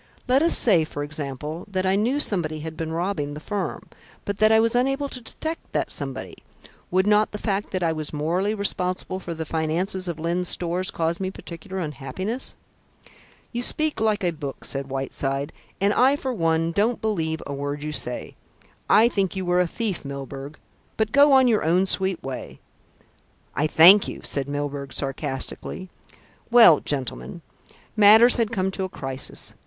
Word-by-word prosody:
Let 260 Hz, +2 st, +4 dB
us 335 Hz, -, +5 dB
say, 185 Hz, -9 st, +4 dB
for 145 Hz, -2 st, -5 dB
example, 150 Hz, +2 st, -5 dB
that 190 Hz, -1 st, -1 dB
I 190 Hz, +1 st, +3 dB
knew 240 Hz, +8 st, +1 dB
somebody 160 Hz, -, -1 dB
had 160 Hz, +1 st, -6 dB
been 160 Hz, 0 st, -4 dB
robbing 165 Hz, -4 st, -2 dB
the -, -, -6 dB
firm, 205 Hz, +5 st, -4 dB, 0.4 s
but 200 Hz, 0 st, -3 dB
that 215 Hz, +1 st, +5 dB
I 220 Hz, -, +6 dB
was 230 Hz, 0 st, +2 dB
unable 270 Hz, +3 st, +1 dB
to 255 Hz, -, -8 dB
detect 320 Hz, +8 st, -7 dB
that -, -, -1 dB
somebody. -, -, -5 dB, 0.5 s
Would 185 Hz, +1 st, +2 dB
not 210 Hz, +1 st, +3 dB
the 210 Hz, -, -5 dB
fact 205 Hz, -1 st, -2 dB
that 185 Hz, -2 st, -2 dB
I 165 Hz, -1 st, +1 dB
was 155 Hz, -1 st, 0 dB
morally 175 Hz, +8 st, 0 dB
responsible 185 Hz, -2 st, -2 dB
for 170 Hz, -2 st, -6 dB
the 160 Hz, 0 st, -4 dB
finances 170 Hz, +5 st, 0 dB
of 170 Hz, -2 st, -3 dB
Lyne's 170 Hz, +3 st, -1 dB
Stores 180 Hz, +2 st, 0 dB
cause 165 Hz, +1 st, -1 dB
me 190 Hz, -1 st, -2 dB
particular 185 Hz, 0 st, -8 dB
unhappiness?" 185 Hz, -, -4 dB, 1.0 s
"You 240 Hz, -, -3 dB
speak 305 Hz, 0 st, -1 dB
like 215 Hz, -2 st, +1 dB
a 175 Hz, -, +2 dB
book," 145 Hz, -4 st, -7 dB
said 135 Hz, 0 st, -4 dB
Whiteside, 135 Hz, +2 st, -3 dB, 0.3 s
"and 200 Hz, +2 st, +2 dB
I 265 Hz, +3 st, +4 dB
for 265 Hz, -3 st, -3 dB
one 165 Hz, -4 st, +1 dB
don't 215 Hz, +6 st, +1 dB
believe 160 Hz, -7 st, -2 dB
a 140 Hz, -, -5 dB
word 145 Hz, +1 st, -4 dB
you 150 Hz, -, -3 dB
say. 125 Hz, -4 st, -4 dB, 0.6 s
I 225 Hz, +2 st, +6 dB
think 195 Hz, -6 st, -1 dB
you 190 Hz, -1 st, -3 dB
were 175 Hz, 0 st, +2 dB
a 180 Hz, -, +3 dB
thief, 205 Hz, 0 st, -3 dB
Milburgh; 140 Hz, +1 st, -7 dB, 0.4 s
but 220 Hz, -1 st, 0 dB
go 285 Hz, +1 st, +6 dB
on 260 Hz, -1 st, +6 dB
your 220 Hz, -3 st, +2 dB
own 175 Hz, +4 st, +3 dB
sweet 190 Hz, -1 st, -1 dB
way." 135 Hz, -1 st, -7 dB, 0.9 s
"I 150 Hz, +3 st, +1 dB
thank 180 Hz, +7 st, +7 dB
you," -, -, -7 dB
said 140 Hz, -1 st, -2 dB
Mr. -, -, -6 dB
Milburgh 145 Hz, -1 st, -4 dB
sarcastically. 140 Hz, +6 st, -4 dB, 0.6 s
"Well, 230 Hz, -10 st, +8 dB
gentlemen, 145 Hz, +4 st, -5 dB, 0.5 s
matters 220 Hz, +3 st, +7 dB
had 230 Hz, -3 st, +1 dB
come 190 Hz, -3 st, 0 dB
to 190 Hz, -, -3 dB
a 190 Hz, -, -3 dB
crisis. 135 Hz, -5 st, -5 dB
180 Hz, 180 wpm, -24 LUFS, 150-210 Hz, 1.0 s, Well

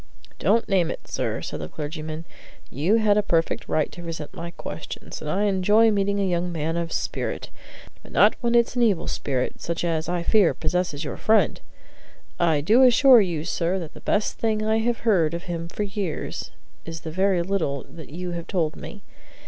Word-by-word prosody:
"Don't 230 Hz, -, +2 dB
name 185 Hz, -4 st, +2 dB
it, -, -, -7 dB
sir," -, -, -2 dB
said -, -, -5 dB
the 75 Hz, -, -4 dB
clergyman; 155 Hz, +1 st, -6 dB, 0.5 s
"you 160 Hz, -, +2 dB
had 210 Hz, -2 st, +4 dB
a -, -, +3 dB
perfect 165 Hz, -5 st, 0 dB
right 155 Hz, -, +1 dB
to 175 Hz, -, -10 dB
resent 165 Hz, -3 st, -6 dB
my 170 Hz, +1 st, -6 dB
questions, 170 Hz, -, -8 dB
and 150 Hz, -, -5 dB
I 195 Hz, +6 st, +1 dB
enjoy 210 Hz, +3 st, +4 dB
meeting 200 Hz, 0 st, +1 dB
young 175 Hz, 0 st, -1 dB
men 165 Hz, 0 st, -2 dB
of 170 Hz, -1 st, -2 dB
spirit; -, -, -3 dB, 0.5 s
but -, -, -15 dB
not -, -, +5 dB
when 240 Hz, -1 st, +1 dB
it's 235 Hz, +1 st, +3 dB
an 245 Hz, -, +1 dB
evil 205 Hz, -8 st, +2 dB
spirit, 130 Hz, -3 st, -2 dB
such 170 Hz, 0 st, -3 dB
as, 165 Hz, -2 st, -1 dB
I 175 Hz, -1 st, -1 dB
fear, 200 Hz, -2 st, +4 dB
possesses 180 Hz, -5 st, -1 dB
your -, -, -5 dB
friend! 220 Hz, 0 st, +2 dB, 0.8 s
I 160 Hz, -4 st, +3 dB
do 220 Hz, -, +4 dB
assure 255 Hz, -1 st, +7 dB
you, 170 Hz, -6 st, -2 dB
sir, 175 Hz, +1 st, 0 dB
that 165 Hz, -5 st, -6 dB
the -, -, -13 dB
best 210 Hz, 0 st, 0 dB
thing 215 Hz, -1 st, 0 dB
I 220 Hz, +1 st, +2 dB
have 235 Hz, +1 st, -1 dB
heard 170 Hz, -8 st, +2 dB
of 170 Hz, -, -5 dB
him 170 Hz, -1 st, -4 dB
for 210 Hz, -, -4 dB
years 195 Hz, -5 st, -4 dB, 0.3 s
is 165 Hz, -1 st, -7 dB
the 160 Hz, -, -6 dB
very 185 Hz, 0 st, +2 dB
little 165 Hz, -8 st, -1 dB
that 160 Hz, -3 st, -11 dB
you 175 Hz, +4 st, -5 dB
have 170 Hz, -1 st, -5 dB
told 165 Hz, -5 st, -1 dB
me. 205 Hz, -, -10 dB
175 Hz, 195 wpm, -24 LUFS, 165-210 Hz, 0.8 s, assure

